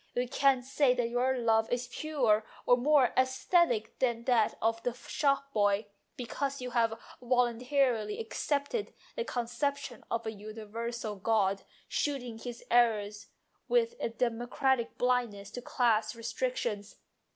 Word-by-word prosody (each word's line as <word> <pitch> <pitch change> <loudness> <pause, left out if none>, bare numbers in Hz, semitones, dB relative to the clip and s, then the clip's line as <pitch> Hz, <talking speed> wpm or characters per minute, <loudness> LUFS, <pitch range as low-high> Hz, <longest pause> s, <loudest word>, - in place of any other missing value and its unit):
You 245 +1 0
can't 265 -1 +2
say 270 -1 +3
that 240 -2 0
your 255 +2 +1
love 225 -2 +2
is 245 0 -1
purer 245 -7 +1 0.2
or 245 - +6
more 270 +1 +3
aesthetic 260 - +2
than 235 -3 0
that 235 -3 +2
of 225 +1 0
the 245 - -1
shopboy, 245 -8 0 0.3
because 275 +3 -3
you 250 -1 -5
have 230 -2 +1 0.2
voluntarily 245 -2 +1
accepted 285 - -2 0.2
the 485 - -1
conception 260 - -3
of 230 0 -2
a 220 - -2
universal 215 +1 -6
god, 200 -1 +1 0.3
shooting 250 -6 -2
his 240 0 -7
arrows 215 -4 +2 0.4
with 475 -1 +2
a - - -1
democratic 240 +2 0
blindness 240 -5 0
to 245 - -6
class 225 -3 +1
restrictions. 230 - -3
240 Hz, 130 wpm, -31 LUFS, 225-265 Hz, 0.4 s, or